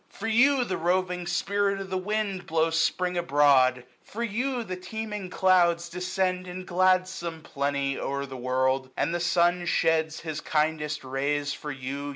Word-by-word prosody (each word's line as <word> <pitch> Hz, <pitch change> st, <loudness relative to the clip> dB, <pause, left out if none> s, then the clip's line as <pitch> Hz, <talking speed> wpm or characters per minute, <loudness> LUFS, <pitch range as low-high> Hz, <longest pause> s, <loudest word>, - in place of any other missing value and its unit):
For 200 Hz, -, -8 dB
you, 255 Hz, +4 st, +4 dB
the 190 Hz, -6 st, -3 dB
roving 180 Hz, +1 st, 0 dB
spirit 200 Hz, +3 st, 0 dB
of 195 Hz, -1 st, -7 dB
the -, -, -1 dB
wind 200 Hz, -1 st, -2 dB
Blows 160 Hz, 0 st, +1 dB
Spring 180 Hz, +2 st, 0 dB
abroad; 135 Hz, -5 st, +4 dB, 0.2 s
for 230 Hz, +3 st, -6 dB
you, 240 Hz, +3 st, -1 dB
the 185 Hz, -4 st, -5 dB
teeming 210 Hz, +1 st, -6 dB
clouds 175 Hz, -2 st, +3 dB
885 -, -, -21 dB
Descend 185 Hz, +1 st, -1 dB
in 180 Hz, +1 st, -7 dB
gladsome 185 Hz, -2 st, +1 dB
plenty 140 Hz, -1 st, -2 dB
o'er 140 Hz, 0 st, -2 dB
the 135 Hz, -1 st, -9 dB
world 130 Hz, +1 st, 0 dB
j -, -, -27 dB
And 165 Hz, -, 0 dB
the 175 Hz, -, 0 dB
sun 175 Hz, 0 st, +2 dB
sheds 160 Hz, -1 st, +1 dB
his 155 Hz, -2 st, -5 dB
kindest 155 Hz, -1 st, -1 dB
rays 145 Hz, +2 st, -1 dB
for 150 Hz, -, -7 dB
you. 140 Hz, +1 st, -5 dB
175 Hz, 170 wpm, -27 LUFS, 145-185 Hz, 0.2 s, you